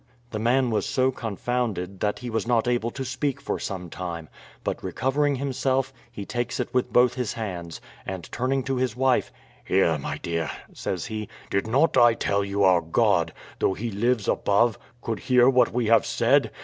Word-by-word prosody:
The 110 - -3
man 125 +2 +2
was 110 +5 0
so 130 -1 +2
confounded 110 -5 -3
that 105 0 0
he 125 -1 -6
was 110 0 -1
not 120 -1 +2
able 120 -1 +1
to 135 +2 -5
speak 135 +2 -2
for 140 - -3
some 90 -3 -4
time; 85 -2 -6 0.3
but, - - -3
recovering 145 +2 0
himself, 135 0 -1 0.2
he 100 - -7
takes 120 +2 -3
it - - -3
with 125 -1 +1
both 125 0 +5
his 125 -4 -2
hands, 90 -7 -5 0.2
and 95 -2 -5
turning 130 +2 0
to 135 0 -1
his 125 -3 0
wife, 130 0 +2 0.3
"Here, 85 -5 +2
my - - -4
dear," 85 -2 -2 0.2
says - - -3
he, 110 -1 -5 0.2
"did 100 +2 0
not 135 +6 +3
I 120 -2 +6
tell 100 -2 0
you 100 0 0
our 90 -2 +5
God, 85 -1 +2 0.3
though 95 - +2
He 115 +1 -4
lives 110 +1 0
above, 105 +2 +2 0.2
could 115 -2 -2
hear 125 -1 +4
what 125 -2 +4
we 120 0 0
have 115 0 +4
said? - - +3
115 Hz, 190 wpm, -25 LUFS, 100-130 Hz, 0.3 s, I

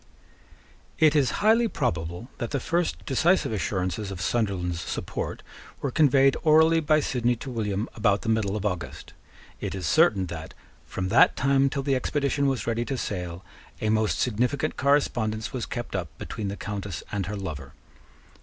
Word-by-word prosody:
It 155 -1 +5
is 140 -4 +4 0.2
highly 230 +2 +5
probable 85 - -2
that 120 - -2
the 140 - -1
first 170 +6 -1
decisive 165 +2 +2
assurances 95 -1 -2
of 95 -2 -6
Sunderland's 95 -5 -1
support - - -4 0.4
were 140 - -2
conveyed 135 -2 +4
orally 160 +1 +5
by 155 -1 +3
Sidney 120 -3 0
to 125 +3 -7
William 105 -2 -2
about 105 -2 +1
the - - -2
middle 110 -3 +1
of 105 -1 -3
August. 90 -7 -4 0.5
It - - -4
is 95 -2 -4
certain 150 - +4
that, 80 -2 -8 0.3
from 95 -1 -3
that 115 - +5
time 140 0 +3
till 140 0 -3
the 135 0 +1
expedition 140 +2 0
was 130 -7 -1
ready 115 0 0
to 135 - -3
sail, 90 -4 -4 0.3
a 110 - -1
most 110 -1 +1
significant 125 +4 0
correspondence 120 -6 +1
was 125 -3 -3
kept 120 -4 -5
up 90 -4 -2
between 110 -3 -5
the 100 +1 -4
Countess 100 -4 -5
and 100 -4 -2
her 105 +1 -4
lover. 75 -8 -6
110 Hz, 165 wpm, -26 LUFS, 95-140 Hz, 0.5 s, It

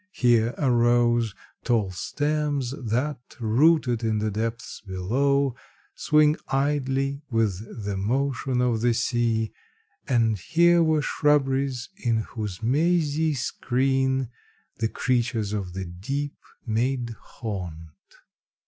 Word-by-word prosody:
Here 120 -1 +3
arose 120 -3 +2 0.3
Tall 110 -6 +1
stems, 145 - -1
that, 125 +7 -1 0.2
rooted 125 +1 +3
in 110 -1 +1
the 105 0 -1
depths 115 +3 -4
below, 130 +8 +1 0.4
Swing 150 0 +3
idly 135 0 0
with 110 -1 -2
the 100 -1 -2
motion 130 +4 0
of 120 -3 +1
the 120 0 +2
sea; 115 -2 0 0.5
And 115 -5 +2
here 170 - +4
were 155 -2 +2
shrubberies 135 -4 +1
in 115 - 0
whose 105 -2 -5
mazy 155 +3 +2
screen, 130 0 0 0.5
The 110 -1 0
creatures 120 -5 0
of 95 -4 -3
the 95 0 -4
deep 135 +12 -4 0.3
made 120 +1 0
haunt." 90 -8 -6
120 Hz, 105 wpm, -25 LUFS, 110-140 Hz, 0.5 s, here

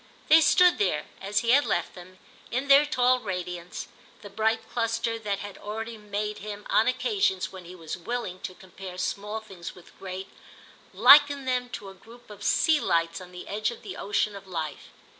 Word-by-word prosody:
They 320 +1 +8
stood 360 +3 +5
there, 180 -7 +1 0.2
as 205 +2 0
he 235 - +2
had 285 +3 +6
left 175 - -1
them, 185 +1 -13 0.3
in 260 +4 -2
their 280 +2 +7
tall 255 -3 +3
radiance, 180 -4 -5 0.4
the 205 - -10
bright 220 +2 0
cluster 230 0 -1
that 205 -2 -2
had 205 -1 -8
already 225 +2 -5
made 210 0 -4
him, 210 0 -7
on 220 - +4
occasions 255 - 0
when 185 -2 -10
he 180 +2 -10
was 165 -3 -6
willing 185 -1 -4
to 185 - -7
compare 185 0 -10
small 210 +3 -3
things 190 -5 -9
with 180 - -17
great, 190 0 -6 0.6
liken 280 +6 +7
them 250 -1 -1
to 200 -6 -6
a - - -11
group 230 +4 -16
of 205 -1 -11
sea 315 +6 +3
lights 165 +1 0
on 180 0 -11
the 180 0 -9
edge 210 +2 -1
of 235 - -9
the 195 -3 -7
ocean 205 +1 -1
of 195 -1 -10
life. 160 -5 -5
210 Hz, 190 wpm, -27 LUFS, 185-240 Hz, 0.6 s, They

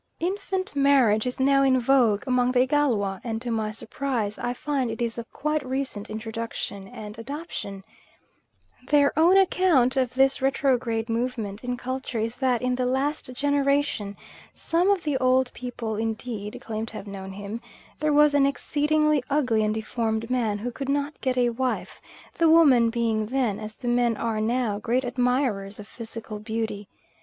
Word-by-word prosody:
Infant 375 -1 -2
marriage 260 -6 +4
is 250 - -4
now 275 +1 +4
in 265 -1 +4
vogue 240 -5 +3
among 250 -1 +2
the 250 -1 +3
Igalwa, 245 -9 +1
and 225 -2 -3
to 240 0 -3
my 220 -1 -1
surprise 225 -2 -3
I 240 0 -1
find 265 0 -2
it 225 - -5
is 235 -1 -2
of 230 - -9
quite 300 0 -1
recent 260 -5 -4
introduction 220 -2 -5
and 210 +2 -9
adoption. 230 - -6 1.0
Their 285 -1 +4
own 340 +5 +5
account 345 -9 +3
of 255 -1 0
this 270 0 +3
retrograde 250 -4 +1
movement 230 -3 -3
in 245 0 -2
culture 255 -1 -4
is 225 +2 -2
that 250 -3 +1
in 250 0 +1
the 250 0 0
last 270 +1 -1
generation 280 -6 0 0.4
some 345 +4 +1
of 395 -3 +2
the 295 -3 0
old 255 0 +2
people 235 -3 -5
indeed 220 -1 -4
claim 220 0 -4
to 220 - -7
have - - -8
known 195 -1 -7
him 205 +4 -6 0.4
there 305 0 +1
was 295 0 +5
an 280 -1 +4
exceedingly 300 0 +1
ugly 250 -7 +2
and 215 0 0
deformed 220 +1 -2
man 225 -5 +1
who 240 +4 -4
could 275 +3 -5
not 285 +1 -1
get 255 -1 0
a 245 -1 +3
wife, 255 +2 -3 0.3
the 330 -1 +3
women 275 -8 +6
being 225 -2 0
then, 240 -5 0
as 215 0 -7
the 245 - -7
men 240 -2 +2
are 225 -2 -1
now, 225 -2 0
great 240 +4 0
admirers 245 -5 0
of 205 - -9
physical 225 -2 -7
beauty. 220 -2 -4
245 Hz, 170 wpm, -25 LUFS, 220-275 Hz, 1.0 s, women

